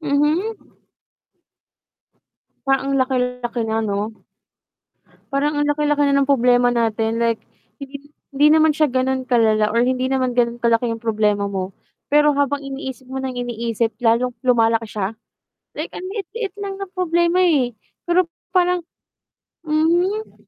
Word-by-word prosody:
Mhm. 310 +9 +1 2.1
Parang 270 0 +1
ang - - +2
laki-laki 250 -2 -1
na 220 0 -1
'no. 205 +1 -2 1.2
Parang 290 +2 0
ang 290 - +1
laki-laki 295 0 +1
na 280 - +2
ng 275 - -2
problema 245 -2 +4
natin 225 -1 0
like, 230 -1 +1 0.4
hindi 280 +1 -10 0.2
hindi 290 +2 +4
naman 315 0 +5
siya 305 -1 +3
ganun 260 0 0
kalala 215 -3 +3
or 230 - +2
hindi 255 0 0
naman 260 -1 0
ganun 240 -1 +1
kalaki 235 0 +2
yung 225 - -6
problema 210 -3 0
mo, 190 -1 -4 0.4
pero 295 -1 +4
habang 285 0 +1
iniisip 270 -2 -7
mo 265 - -6
nang 265 -1 -3
iniisip, 235 -2 -2
lalong 235 +2 +2
lumalaki 230 -2 +3
siya, 210 0 -4 0.6
like - - -5
ang - - -6
liit-liit 420 +1 -5
lang 395 -1 -4
ng 390 -1 -7
problema 345 -1 +1
eh, 300 -9 +3 0.3
pero 350 0 +2 0.2
parang 360 -1 +2 0.8
mhm. 345 +8 0
260 Hz, 140 wpm, -20 LUFS, 230-300 Hz, 2.1 s, naman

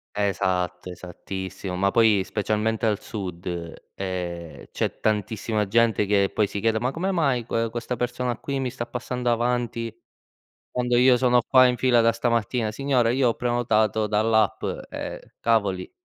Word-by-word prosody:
Esatto, 90 -3 -1
esattissimo. 90 +1 -6
Ma 100 +2 +1
poi, 110 -4 +4
specialmente 110 +2 -1
al 105 -2 +1
Sud, 90 -5 -7 0.5
ehm, 90 -3 -5
c'è - - -2
tantissima 110 0 -1
gente 115 0 +3
che, 100 -1 +2
poi, 105 - +2
si 100 - -4
chiede: 110 +1 +1
“Ma 125 +3 -1
come 180 +6 -2
mai 140 -10 +1
que 115 0 -1
questa 120 +2 -4
persona 125 +1 -2
qui 140 -1 -3
mi 130 -2 -2
sta 120 -1 -5
passando 125 0 -3
avanti, 120 -1 -1 0.8
quando 125 -1 0
io 125 +1 +6
sono 125 -1 +3
qua 130 +2 +6
in 125 0 +1
fila 125 -1 +3
da 115 0 +4
stamattina?” 115 -1 0
“Signora, 125 0 +1
io 130 +1 +2
ho - - -2
prenotato 110 -3 +1
dall'app”, 110 +1 +2 0.3
eh, - - -7
cavoli. 100 -5 +1
115 Hz, 155 wpm, -24 LUFS, 100-125 Hz, 0.8 s, io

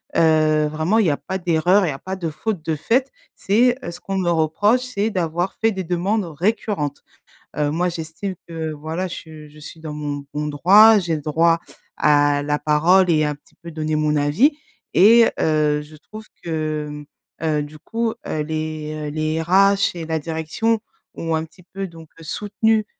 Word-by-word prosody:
Heu, 155 -1 +3
vraiment 160 +9 +1
il 200 - +3
y - - +4
a 145 - 0
pas 190 0 -5
d'erreur, 180 +3 +3
il - - 0
y - - -1
a 135 - -6
pas 190 +6 -5
de 175 -3 -3
faute 175 +2 -4
de 160 - -1
faite. 250 - 0 0.2
C'est, 240 +5 +3
heu - - -4
ce 175 +1 -9
qu'on 195 +2 -4
me 175 - 0
reproche, 170 +9 +2
c'est 225 -4 -2
d'avoir 175 -2 -2
fait 225 0 +3
des 190 -2 -4
demandes 180 +4 -1
récurrentes. 165 -3 -2 0.5
Heu, 150 -1 0
moi 175 +3 0
j'estime 170 +3 -5
que 160 -1 -4
voilà, 160 +5 -4
je 155 -3 -9
je 150 +1 -16
suis 150 +2 -11
dans 155 -1 -7
mon 145 -1 -5
bon 150 0 -2
droit, 205 +9 +6
j'ai 170 -3 -1
le 150 - -5
droit 165 +3 +2 0.4
à 145 -1 +3
la 150 0 -1
parole 175 +5 +3
et 155 -2 +3
un 150 0 0
petit 145 - -28
peu 170 - -11
donner 155 -1 -2
mon 150 0 +1
avis 145 - +3 0.4
et 230 +5 +7
heu, 150 -1 +2
je 150 +1 -13
trouve 215 +8 -12 0.2
que, 155 -2 -2
hem, 150 0 -8 0.5
heu, 145 - -1
du 150 +1 -11
coup, 225 +6 -2
heu, 155 - -2
les, 155 -1 -4
heu, - - -3
les 155 +1 -1
RH 195 +3 +3
et 165 -2 -5
la 160 0 -1
direction 165 +9 -1 0.4
ont 165 -1 -3
un 160 - -1
petit 180 +3 -20
peu 195 +2 -6
donc 165 -2 -14
heu, - - -12
soutenu, 210 +5 0
160 Hz, 200 wpm, -21 LUFS, 155-190 Hz, 0.5 s, et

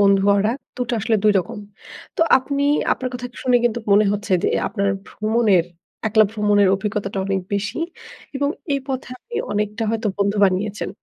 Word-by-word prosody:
বন্ধু 195 -1 +4
গড়া 210 +3 +2 0.2
২ 250 - -1
টা 240 - 0
আসলে 220 +2 +1
২ 210 - +6
রকম। 180 +3 -4 0.6
তো - - -1 0.2
আপনি 280 +2 -2 0.3
আপনার 255 - -3
কথা 245 0 -4 0.2
শুনে 250 -1 +4
কিন্তু 235 -1 +1
মনে 210 +1 +6
হচ্ছে 205 -1 -3
যে - - +2 0.2
আপনার 200 -2 -1 0.2
ভ্রমণের 215 -5 +2 0.4
একলা 215 0 +5
ভ্রমণের 205 -2 +3
অভিজ্ঞতাটা 200 0 -3
অনেক 195 -1 0
বেশি। 200 +4 -2 0.6
এবং 285 +1 0 0.2
এই 275 - 0
পথে 260 -1 -3
আপনি 475 - -13 0.2
অনেকটা 210 +2 -2
হয়তো 225 0 -1
বন্ধু 200 +1 +1
বানিয়েছেন। 200 +2 -1
210 Hz, 170 wpm, -21 LUFS, 200-240 Hz, 0.6 s, ২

